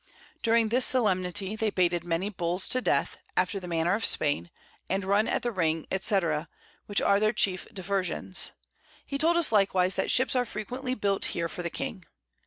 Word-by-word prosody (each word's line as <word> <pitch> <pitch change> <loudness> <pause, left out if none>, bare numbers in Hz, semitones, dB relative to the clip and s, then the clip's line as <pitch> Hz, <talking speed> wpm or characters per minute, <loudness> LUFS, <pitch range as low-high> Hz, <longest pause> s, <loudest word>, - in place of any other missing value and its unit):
During 230 -1 +2
this 250 +3 +3
Solemnity, 195 -4 +1
they 220 0 0
baited 175 -3 0
many 175 +4 -2
Bulls 180 0 -1
to 255 - +2
Death, - - 0 0.2
after 200 - +1
the 180 - -9
manner 170 +1 0
of 220 +3 -1
Spain, 145 - +2 0.4
and 190 0 -1
run 200 +3 +2
at - - -1
the 240 - -1
Ring, 165 -5 0
&c. 195 +1 +2 0.7
which 205 - 0
are 200 - +4
their 215 +1 +2
chief 190 -4 +1
Diversions: 190 -1 -1 0.6
He 275 - -4
told 335 +3 +3
us 340 -7 +3
likewise 190 -3 +3
that - - 0
Ships 255 0 +3
are 250 - +3
frequently 250 +4 -4
built 200 -4 0
here 170 -1 0
for 175 - -5
the 170 - -3
King. 185 +1 -6
195 Hz, 185 wpm, -27 LUFS, 180-225 Hz, 0.7 s, are